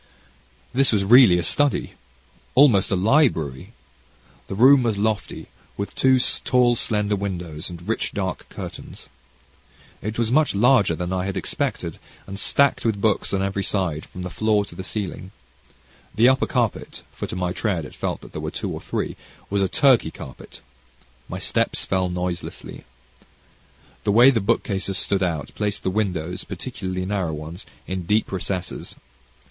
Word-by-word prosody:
This 135 +1 +3
was 105 -3 +2
really 110 -3 +7
a 90 - 0
study 145 +9 +1 0.6
almost 125 -9 +5
a - - +1
library. 95 - +1 0.7
The - - -5
room 130 +5 +7
was 115 -4 0
lofty, 105 0 -2 0.3
with 100 - -4
two 130 0 +4 0.3
tall 125 -1 +3
slender 105 -2 0
windows, 90 -6 -4
and 85 +1 -10
rich 115 - -1
dark 95 -3 -4
curtains. - - -9 0.9
It 110 +2 -4
was 115 -1 0
much 150 -3 +3
larger 110 -5 +4
than 90 +2 -3
I 90 0 -1
had 100 0 -3
expected, - - -3 0.3
and 100 0 -7
stored 140 +6 +2
with 110 -3 0
books 105 0 +1
on 95 -1 0
every 100 0 -1
side, 90 -8 -1
from 90 - -8
the 90 - -5
floor 105 0 +1
to 100 - -11
the 95 - -7
ceiling. 95 -2 -4 0.9
The 115 +3 +6
upper 130 0 +2
carpet 120 -6 -2
for - - -6
to - - -6
my 90 -1 -1
tread 90 -8 -1
it - - -11
felt - - -3
that - - -13
there - - -6
were - - -3
two - - -4
or - - -5
three - - -3 0.4
was 100 0 +1
a 95 - +2
Turkey 135 -4 +4
carpet. 65 - -11 0.7
My - - -4
steps - - -1
fell 95 -1 0
noiselessly. 90 -1 -5 1.2
The 120 +6 +7
bookcases 100 -3 0
standing 95 -2 +1
out, 80 -5 -4
placed 105 -1 -2
the 95 - 0
windows, 90 -5 -2
particularly 95 0 -5
narrow 95 -5 -1
ones, 80 +5 -8 0.2
in 95 -2 -4
deep 105 +3 +1
recesses. 95 -1 -4
100 Hz, 160 wpm, -23 LUFS, 90-115 Hz, 1.2 s, really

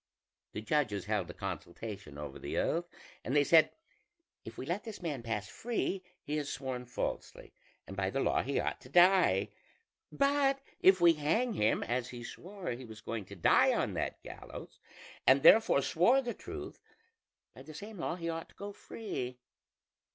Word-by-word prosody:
The 105 - -4
judges 110 -6 0
held 105 -5 -1
a - - -6
consultation 95 -3 -6
over 75 -2 -7
the - - -4
oath, 175 +1 0 0.3
and 130 - -2
they 145 - +6
said: 160 +2 +6 0.7
'If 110 - -10
we - - -5
let 175 +7 -2
this 220 -3 -7
man 150 -8 -3
pass 115 -3 -3
free, 195 - -2 0.2
he 150 +1 -2
has 145 -2 -2
sworn 130 -2 -4
falsely, 120 - -5 0.3
and 95 - -8
by 95 0 0
the 135 - -2
law - - +2
he 140 +1 -1
ought - - -2
to 125 - -14
die; 180 +5 +5 0.6
but 275 -1 +2 0.2
if 185 -1 +6
we 170 -1 +7
hang 165 +11 +1
him, 105 - +2
as 125 +1 -2
he 120 -1 -8
swore 190 - -7
he 120 +2 -6
was 110 -3 -10
going 110 -2 -5
to 100 - -10
die 90 - +4
on - - 0
that - - -3
gallows, - - -10 0.5
and 135 +2 +6
therefore 210 -6 +7
swore 230 +11 +4
the 245 -3 -3
truth, - - -8 0.7
by - - -12
the 155 - -11
same 205 +4 -8
law 165 - -2
he 170 -2 -5
ought 165 0 -4
to - - -22
go 205 0 -7
free.' 130 - -5
145 Hz, 180 wpm, -32 LUFS, 115-185 Hz, 0.7 s, we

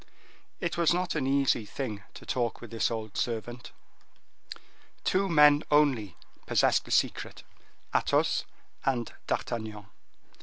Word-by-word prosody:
It 170 -2 -2
was 170 0 +4
not 180 0 -1
an 140 -4 -1
easy 135 -4 +2
thing 105 -2 -5
to - - -11
talk 120 -2 -1
with 120 - -11
this 115 - +1
old 110 -2 -5
servant. 120 +1 -3 1.3
Two 195 +1 +1
men 150 -2 +6
only 130 - +2 0.3
possessed - - +3
the - - -12
secret, - - 0 0.5
Athos - - +2 0.4
and 125 -4 -1
D'Artagnan. 110 -3 -3
125 Hz, 120 wpm, -29 LUFS, 110-150 Hz, 1.3 s, men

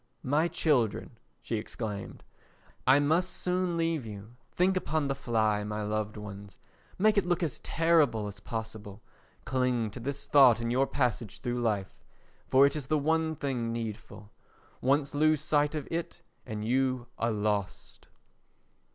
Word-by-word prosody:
"My 150 +5 +2
children," 120 - 0 0.2
she 115 - -2
exclaimed, 105 -2 -6 0.6
"I 135 +2 +7
must 160 +6 +2
soon 180 -1 -1
leave 165 -4 0
you; 105 +1 -9 0.2
think 185 +2 +2
upon 155 -5 0
the 135 - 0
fly, 110 -6 0
my 105 0 -3
loved 105 0 -2
ones; 100 -1 -9 0.4
make 210 +1 +4
it 195 - -2
look 175 0 +1
as 155 -6 -2
terrible 155 -9 +2
as 100 -1 -7
possible; 110 -1 -7 0.4
cling 125 -4 0
to 125 - -8
this 140 +3 -4
thought 130 -6 +6
in 115 0 -2
your 135 +2 +2
passage 120 -5 -2
through 120 -2 -2
life, 105 -5 -1 0.5
for 135 +1 +6
it 140 - +1
is 145 -4 -4
the 155 - +2
one 160 +2 +1
thing 125 -5 -2
needful; 110 -2 -6 0.5
once 140 +2 +1
lose 155 +1 +3
sight 150 0 +1
of 150 -3 -4
it 165 0 -4 0.2
and 110 -2 -4
you 130 0 +1
are 115 - +1
lost." 105 -2 -3
125 Hz, 150 wpm, -29 LUFS, 110-150 Hz, 0.6 s, I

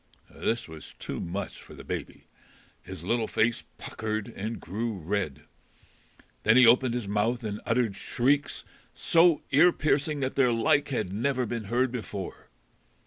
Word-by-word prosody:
This 115 +1 -1
was 80 -1 -11
too - - -5
much 95 +4 -5
for - - -13
the - - -10
baby. - - -6 0.6
His 95 -3 -9
little 115 +4 0
face 115 +1 0
puckered 110 0 -4
and 110 +4 -4
grew 110 +3 -3
red. 80 -5 -3 1.0
Then 110 +3 +5
he 130 - +8
opened 120 +1 +5
his 120 -5 -3
mouth 110 +4 0
and 105 -1 -4
uttered 115 -4 +1
shrieks 140 +3 0 0.3
so 165 -2 +4
ear 175 +6 +6
piercing 150 -2 0
that 130 0 -1
their 130 -3 +4
like 130 +5 +2
had 110 -9 -2
never 125 +4 0
been 115 -1 -4
heard 120 +4 +1
before. 105 -6 -6
115 Hz, 150 wpm, -28 LUFS, 105-130 Hz, 1.0 s, he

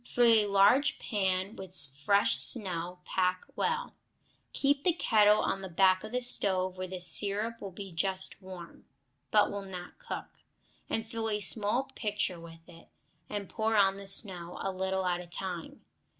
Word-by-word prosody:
Fill 245 0 +1
a 225 -2 +5
large 200 +9 +4
pan 190 -1 -1
with 190 -1 -9 0.3
fresh 200 +4 +3
snow, 180 -5 0
pack 185 0 0
well; 475 +1 -1 0.6
keep 280 0 +1
the 355 - +3
kettle 210 -9 +4
on 195 - -1
the 190 - -7
back 185 +2 +3
of 215 - -8
the 250 - 0
stove, 190 -6 +2
where 185 0 -5
the 185 0 -6
syrup 205 +5 +2
will 200 - -5
be 190 +1 -9
just 190 +3 -1
warm, 185 -2 -11 0.4
but 210 -1 +3
will 200 0 -4
not 185 - -9
cook, - - -8 0.5
and 225 - -2
fill 225 -1 -4
a 210 -1 -1
small 210 +4 +1
pitcher 210 -6 -2
with 165 0 -13
it, 165 -1 -16 0.4
and 205 -2 -4
pour 220 0 -1
on 195 -1 +4
the 200 0 -8
snow, 185 -3 +1
a 195 - -1
little 190 0 -2
at 175 -1 0
a 175 - -11
time. 175 -1 -6
195 Hz, 170 wpm, -30 LUFS, 185-215 Hz, 0.6 s, a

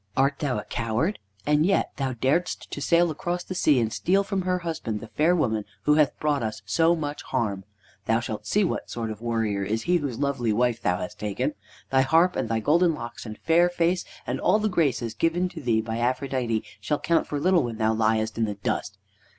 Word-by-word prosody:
Art 135 +2 +2
thou 135 -6 -1
a 105 - -3
coward? 120 - -1 0.3
and 150 +1 +3
yet 195 +3 +2
thou 135 -2 -1
daredst 135 +9 -1
to - - -5
sail 170 0 +3
across 175 +3 -3
the - - -6
sea 150 -7 +3
and 115 -2 0
steal 195 +2 +2
from 195 -1 -2
her 180 0 0
husband 115 -10 -3
the 110 - -10
fair 165 +4 +2
woman 110 -10 0 0.2
who 150 - +4
hath 150 -2 +3
brought 150 -3 +1
us 110 -1 -4
so 165 +1 +3
much 145 -2 -4
harm. 100 -4 -2 0.4
Thou 115 +1 +2
shalt 110 -2 -5
see 210 - +2
what 185 - -2
sort 115 -2 -3
of 110 0 -8
warrior 115 -4 -1
is 110 +3 -2
he 175 +1 +3
whose 140 -7 -3
lovely 135 -5 0
wife 120 +1 +1
thou 90 - +1
hast 105 +4 -6
taken. 105 -2 -1 0.4
Thy 130 0 +5
harp 165 +7 +3
and - - -2
thy 115 0 +1
golden 165 +8 +3
locks 120 -2 -7
and 110 0 -7
fair 170 +2 +3
face, 175 +1 +1 0.2
and - - -2
all 190 - +4
the 215 0 0
graces 135 - 0
given 175 +2 +1
to 170 -3 -9
thee 115 -4 +2
by 110 +1 -4
Aphrodite, 125 -2 0 0.2
shall 125 +9 -1
count 170 0 +1
for 145 - -2
little 180 +2 +4
when 120 -4 -4
thou 110 0 +2
liest 110 0 +1
in 115 - +3
the 105 -1 -3
dust! 100 0 -3
130 Hz, 220 wpm, -25 LUFS, 110-165 Hz, 0.4 s, Thy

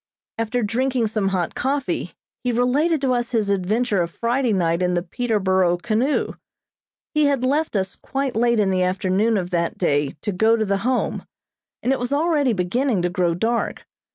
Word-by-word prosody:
After 230 +2 -1
drinking 245 +3 0
some 215 -2 -1
hot 185 -3 -1
coffee, 275 0 -2 0.3
he 250 - +1
related 270 +7 +2
to 260 -2 +2
us 240 0 -2
his 215 -3 +1
adventure 200 +2 +1
of 170 - -1
Friday 240 +5 0
night 170 -3 +1
in 180 0 +1
the 175 - 0
Peterborough 190 -4 +1
canoe. 235 +9 0 0.8
He 305 -1 +3
had 280 -3 +1
left 290 +1 0
us 190 -2 -1
quite 270 -1 -3
late 235 0 +2
in 200 -2 +2
the 185 -1 +1
afternoon 190 +4 +1
of 180 -1 -3
that 170 -1 -1
day 145 -5 0
to 210 - -1
go 220 +4 +3
to 220 -1 0
the 200 -1 +1
Home, 250 +5 -1 0.6
and 255 - +1
it 270 - +1
was 245 +1 -2
already 295 -3 +2
beginning 210 +2 0
to 180 - +1
grow 175 -2 +1
dark. 230 +6 -1
225 Hz, 180 wpm, -22 LUFS, 185-250 Hz, 0.8 s, He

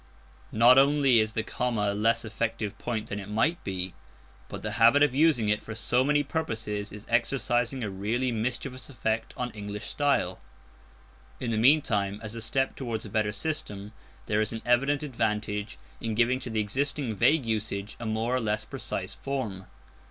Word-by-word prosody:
Not 120 +4 +7
only 140 -3 +5
is 110 0 +1
the 110 - 0
comma 115 -3 -1
a - - -2
less 115 +3 +1
effective 110 -1 -3
point 115 -3 -3
than 105 - -3
it 100 - -8
might 150 +11 +1
be, 95 -1 -1 0.6
but - - -7
the 105 - -2
habit 135 +6 +7
of 145 -3 +3
using 140 -6 +3
it 105 0 +2
for 110 - -8
so 120 +3 +2
many 145 +1 +2
purposes 110 -9 -3
is 105 0 -9
exercising 120 +1 +1
a 105 - -2
really 115 +7 -1
mischievous 120 +3 -3
effect 110 -4 -2
on 125 -1 -3
English 105 -1 -6
style. 140 -10 0 1.0
In 120 -2 -2
the 110 - 0
meantime, 110 -6 +3
and 105 - -13
as 110 0 -5
a 115 - -6
step 135 +4 0
towards 115 -5 -4
a 105 - -9
better 105 -1 +1
system, 105 -7 -3 0.3
there 105 0 +1
is 110 - +1
an 115 -1 -6
evident 135 +4 +2
advantage 105 -5 -2 0.2
in 115 -1 -3
giving 120 +3 +2
to 130 - -6
the 110 -1 0
existing 130 +3 0
vague 140 +7 +3
usage 105 -2 -2
a 115 - -4
more 110 +3 0
or - - +2
less 105 -2 -1
precise - - -4
form. 115 -9 -4
115 Hz, 180 wpm, -28 LUFS, 105-130 Hz, 1.0 s, Not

